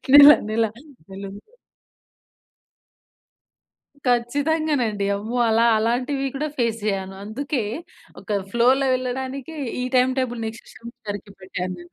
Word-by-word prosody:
నెల 285 0 +12 0.2
నెల 225 +1 +2 0.5
నెలుంది. 195 +1 -8 2.7
ఖచ్చితంగానండి. 250 -2 +1
అమ్మో! 220 +5 -4
అలా 225 +1 +4
అలాంటివి 250 +5 0
కూడా 300 +3 -1
ఫేస్ 230 -2 0
చేయ్యాను. 195 -2 -2
అందుకే 255 +4 -2 0.6
ఒక - - -20 0.2
ఫ్లోలో 255 +4 +3
వెళ్ళడానికి 260 +4 -4 0.3
ఈ - - -1
టైమ్ 255 +1 +4
టేబుల్ 245 -2 -2
నెక్స్ట్ 225 +1 -9
సెమిస్టర్‌కి 210 -4 -8
పెట్టాను 185 -1 -4
నేను. 175 - -15
235 Hz, 105 wpm, -23 LUFS, 215-265 Hz, 2.7 s, నెల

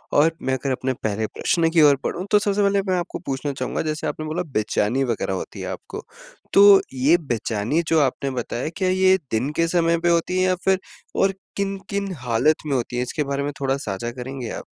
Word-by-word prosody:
और 155 +3 +5
मैं 130 - -1
अगर 130 +1 -1
अपने 130 0 -1
पहले 110 0 -1
प्रश्न 165 -2 +1
की 165 -1 +4
ओर 145 -2 +7
बढ़ूँ 180 - -3
तो 210 - +6
सबसे 205 0 0
पहले 200 0 +3
मैं 185 - +2
आपको 175 - -4
पूछना 135 +1 -2
चाहूँगा 130 -1 -3
जैसे 155 0 -3
आपने 155 +1 -4
बोला 160 +4 -2
बेचैनी 110 +4 +1
वग़ैरह 115 -5 -1
होती 95 - -6
है - - -4
आपको, - - -7 0.5
तो 200 0 +8
ये 140 +7 +4
बेचैनी 120 - -1
जो 160 -1 +3
आपने 135 0 0
बताया 125 +2 -3
क्या 185 -1 +1
ये 190 0 +4
दिन 115 +6 0
के 165 0 +2
समय 170 -1 +2
पे 175 0 +1
होती 170 +2 +1
है 185 - +3
या 185 0 +2
फिर 190 -1 +3 0.4
और 195 0 +3 0.2
किन-किन 195 0 -3
हालत 125 +5 +2
में 140 - 0
होती 120 -1 -2
है? - - +1
इसके 150 +4 -2
बारे 140 0 -2
में 145 - -2
थोड़ा 135 0 +1
साझा 115 -1 -4
करेंगे 125 -1 -6
आप? - - -6
150 Hz, 215 wpm, -22 LUFS, 130-180 Hz, 0.5 s, तो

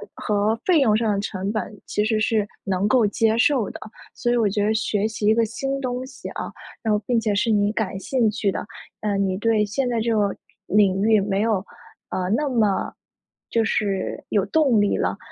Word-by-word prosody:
和 210 +1 0
费 355 -4 +4
用 220 -7 +4
上 220 -1 +1
的 200 - -1
成 200 -1 -3
本 215 -1 -4
其 210 - -1
实 220 0 +1
是 215 -1 +1 0.2
能 195 +1 0
够 240 0 +4
接 220 +2 +1
受 245 -4 +2
的， - - -9 0.3
所 240 - -1
以 245 - +2
我 225 -3 +3
觉 205 +1 0
得 215 +1 +2
学 215 -1 0
习 220 -1 -4
一 215 - +6
个 230 +1 +3
新 270 +5 -3
东 255 -1 -3
西 260 0 -9
啊， - - -5 0.3
然 220 -2 +1
后 210 - +2
并 245 -2 +2
且 220 -2 0
是 205 +3 +1
你 205 -1 +2
感 205 -3 -2
兴 240 +1 +1
趣 210 -1 0
的， - - -4 0.4
呃， 205 -2 0
你 190 -1 0
对 215 0 +2
现 245 +5 -1
在 235 -2 0
这 230 +1 0
个 205 -2 +1 0.3
领 195 -2 +3
域 220 0 +4
没 195 0 0
有， 215 -3 0 0.4
呃， 180 -1 -2
那 300 +3 0
么 220 -6 +1 0.6
就 230 - +2
是 200 -3 -1
有 200 -2 +1
动 285 -8 +3
力 205 - +1
了。 - - -1
215 Hz, 225 characters per minute, -23 LUFS, 205-230 Hz, 0.6 s, 一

